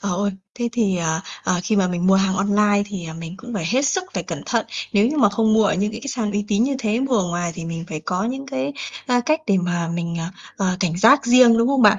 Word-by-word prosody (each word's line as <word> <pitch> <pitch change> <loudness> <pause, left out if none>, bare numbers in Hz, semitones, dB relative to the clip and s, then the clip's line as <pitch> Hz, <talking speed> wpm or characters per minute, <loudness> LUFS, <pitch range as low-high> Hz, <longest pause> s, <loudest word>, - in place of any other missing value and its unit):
Ờ, 200 - -3
ôi, 200 0 0 0.2
thế 240 -1 -2
thì, 215 -6 +1
ờ, 160 -1 -1 0.2
ờ, 180 -1 +1
khi 210 +4 0
mà 190 -2 +2
mình 180 0 -1
mua 190 - +5
hàng 195 -1 +2
online 205 +1 +2
thì, 195 -4 -6
ờ, 160 - -7
mình 165 +1 -8
cũng 245 -2 -9
phải 185 -6 -2
hết 265 +9 +1
sức 370 +6 0
phải - - -1
cẩn - - -6
thận. - - 0 0.3
Nếu 205 0 +4
như 305 - -2
mà 205 - +5
không 220 +2 +1
mua 220 -1 +4
ở - - +2
những 205 +3 0
cái 225 - -7
cái 280 - -7
sàn 225 -6 -2
uy 205 0 -1
tín 210 +2 +2
như 275 +1 0
thế, 225 -1 0
mua 265 -2 +1
ở 195 - +1
ngoài 175 0 -2
thì 170 - -7
mình 165 0 -5
phải 155 - -5
có 180 +5 -2
những 265 +4 -4
cái, 270 +1 -3 0.3
a, 245 -1 +2
cách 310 +6 +1
để 200 - +3
mà 175 -2 -1
mình, 170 0 -3
ờ, 165 - -3 0.3
ờ, 185 -2 0
cảnh 175 -2 0
giác 275 +8 +6
riêng, 240 -1 +6
đúng 230 +2 +3
không 275 -2 +2
bạn? 210 -1 +6
205 Hz, 290 wpm, -21 LUFS, 180-240 Hz, 0.3 s, giác